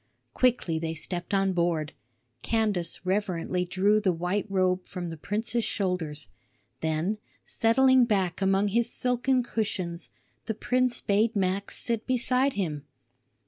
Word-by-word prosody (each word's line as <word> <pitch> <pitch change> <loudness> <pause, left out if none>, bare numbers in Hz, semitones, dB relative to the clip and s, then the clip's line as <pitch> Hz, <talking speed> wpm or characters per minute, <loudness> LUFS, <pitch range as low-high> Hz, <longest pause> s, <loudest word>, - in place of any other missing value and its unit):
Quickly 235 -10 +2
they 165 0 -3
stepped 175 +2 -5
on 195 -1 +2
board. 170 -3 0 0.5
Candace 205 -7 0
reverently 185 -2 -1
drew 195 +4 +2
the 195 -3 +2
white 180 +5 -1
robe 185 -1 +1
from 175 -3 -5
the - - -5
prince's 225 +8 -1
shoulders; 175 - -2 0.5
then, 160 +7 -1 0.3
settling 260 +2 +4
back 195 -5 0
among 195 +1 +2
his 235 +3 +1
silken 250 +1 +1
cushions, 185 -7 -3 0.4
the 220 - -1
prince 255 +1 0
bade 215 +3 +2
Max 195 0 0
sit 230 -2 -2
beside 255 +1 +2
him. 155 -8 -2
195 Hz, 130 wpm, -27 LUFS, 175-225 Hz, 0.5 s, settling